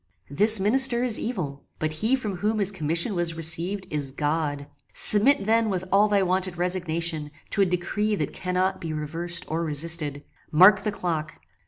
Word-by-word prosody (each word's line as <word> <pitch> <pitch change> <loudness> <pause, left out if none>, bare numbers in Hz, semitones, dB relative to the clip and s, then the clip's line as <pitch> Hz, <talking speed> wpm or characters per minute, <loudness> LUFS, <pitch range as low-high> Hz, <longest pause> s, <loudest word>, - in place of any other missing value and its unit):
This 210 +8 +6
minister 240 +4 +4
is 240 -4 +2
evil, 160 - -5
but 155 0 -2
he 220 +11 +1
from 210 -8 -5
whom 215 +4 -2
his 200 -2 0
commission 170 +3 0
was 175 -2 -1
received 165 +4 +1
is 145 -3 -3
God. 145 0 -3 0.3
Submit 215 +1 +4
then 225 +1 +1
with 185 -2 -3
all 200 +2 +4
thy 200 -2 +1
wonted 185 -1 -1
resignation 170 -3 -1 0.2
to 200 - 0
a 195 - +3
decree 200 +4 -2
that - - -4
cannot 185 +1 -2
be 160 -2 -5
reversed 170 +3 -4
or 165 +2 -3
resisted. 150 -2 -2 0.3
Mark 185 +6 +6
the 210 - -2
clock. 165 -6 -4
180 Hz, 170 wpm, -24 LUFS, 160-205 Hz, 0.3 s, This